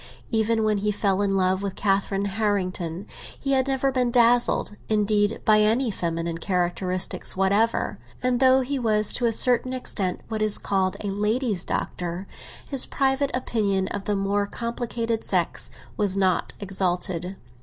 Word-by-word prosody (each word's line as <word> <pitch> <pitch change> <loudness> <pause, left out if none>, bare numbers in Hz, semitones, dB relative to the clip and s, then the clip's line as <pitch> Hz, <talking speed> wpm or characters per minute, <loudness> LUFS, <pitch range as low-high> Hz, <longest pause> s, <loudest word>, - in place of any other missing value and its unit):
Save 225 +1 +2
when 215 -1 +1
he 210 +1 0
fell 200 -1 0
in 195 -1 +1
love 185 0 +1
with 200 -1 -4
Catherine 195 0 0
Harrington, 190 -4 -2 0.3
he 275 - -2
had 265 -1 +2
never 270 0 +1
been 250 -2 +1
dazzled, 240 -3 +3
indeed, 210 0 +1
by 215 -1 +5
any 225 +3 +2
feminine 165 -2 -3
characteristics 180 0 -1
whatever; 200 +4 +1 0.2
and 250 -1 +1
though 260 0 +5
he 270 +2 -2
was 215 -3 +3
to 245 - +1
a - - +2
certain 250 +2 +4
extent 195 -7 -2
what 220 -1 -4
is 215 -1 +4
called 190 -2 -1
a 205 - -3
ladies' 210 0 -1
doctor, 175 +2 -3 0.4
his 275 -3 0
private 270 0 +1
opinion 200 -6 0
of 200 -1 -5
the 205 - 0
more 200 +1 0
complicated 235 0 -3
sex - - 0 0.3
was 200 -2 +1
not 190 -2 +1
exalted. 180 -2 -2
205 Hz, 155 wpm, -24 LUFS, 190-235 Hz, 0.4 s, by